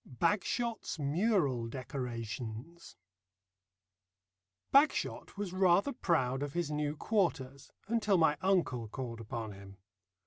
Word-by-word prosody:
BAGSHOT'S 205 - -1
MURAL 145 - +1
DECORATIONS 120 +3 -6 1.8
Bagshot 280 -6 +3
was 200 -3 -3
rather 190 +7 +3
proud 135 - +1
of 145 -1 -3
his 170 -3 -1
new 150 0 -1
quarters 150 - -1 0.2
until 215 -3 +2
my 160 -3 +4
uncle 165 - +1
called 115 0 -6
upon 110 0 -5
him. 100 0 -12
150 Hz, 100 wpm, -33 LUFS, 125-185 Hz, 1.8 s, my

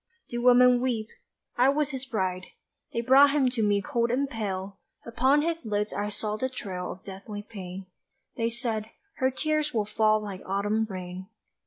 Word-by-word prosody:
Do 240 0 -3
women 250 0 +6
weep? 230 -4 -1 0.5
I 250 +2 +5
was 295 +1 +1
his 265 -1 -5
bride 185 -5 -2 0.4
They 235 - -1
brought 265 +4 +7
him 275 -4 +3
to 240 -3 -1
me 205 -1 +2
cold 235 -5 0
and 270 +4 +1
pale 200 -5 -4 0.3
Upon 260 +5 +3
his 330 -1 -1
lids 210 -1 -1
I 205 +1 -2
saw 210 0 -3
the 260 +4 -1
trail 190 -8 -5
Of 185 - -17
deathly 200 +2 -7
pain. 190 -3 -8 0.5
They 230 0 0
said, 225 -2 -3 0.3
"Her 260 -1 +2
tears 305 +2 -1
will 215 -2 +1
fall 215 0 +3
like 200 -3 -6
autumn 205 +3 0
rain." 185 0 -6
220 Hz, 175 wpm, -27 LUFS, 200-255 Hz, 0.5 s, brought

